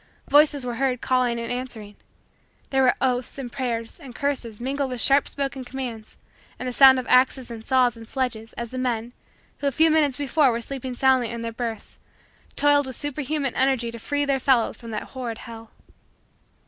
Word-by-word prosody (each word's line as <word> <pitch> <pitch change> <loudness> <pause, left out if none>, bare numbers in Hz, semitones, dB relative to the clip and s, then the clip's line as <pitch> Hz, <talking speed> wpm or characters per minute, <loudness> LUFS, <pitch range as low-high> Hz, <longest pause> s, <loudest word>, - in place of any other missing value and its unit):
Voices 290 -2 +4
were 240 -2 -4
heard 260 -1 0
calling 250 -2 +1
and 230 - -4
answering. 240 -5 -6 0.8
There 270 -1 +3
were 255 -1 +4
oaths 250 -1 -1
and 255 -3 -6
prayers 230 -3 -4
and 255 -4 -11
curses 255 -6 -2
mingled 270 +2 -2
with 250 -1 -4
sharp 275 +4 +5
spoken 275 -1 -3
commands 245 -4 -7 0.4
and 255 - -5
the 250 - -3
sound 265 0 +8
of 255 - -3
axes 255 -1 +3
and 225 -1 -8
saws 250 -1 +2
and 225 -1 -12
sledges, 230 -4 -3
as 235 -1 -6
the 255 - -4
men, 240 -2 -2 0.5
who 285 - -1
a - - +2
few 320 +4 +4
minutes 295 -5 +2
before 290 0 +3
were 230 - -2
sleeping 260 +1 -5
soundly 260 -2 +3
in 235 0 -5
their 230 0 -4
berths, 225 -2 -6 0.6
toiled 290 -1 +3
with 260 - -4
superhuman 290 -1 -2
energy 260 -3 +1
to 235 - -9
free 285 +4 -1
their 275 -1 +1
fellows 255 -3 +2
from 230 - -11
that 215 - -3
horrid 245 -4 -4
hell. 225 -1 -10
255 Hz, 190 wpm, -24 LUFS, 235-275 Hz, 0.8 s, sound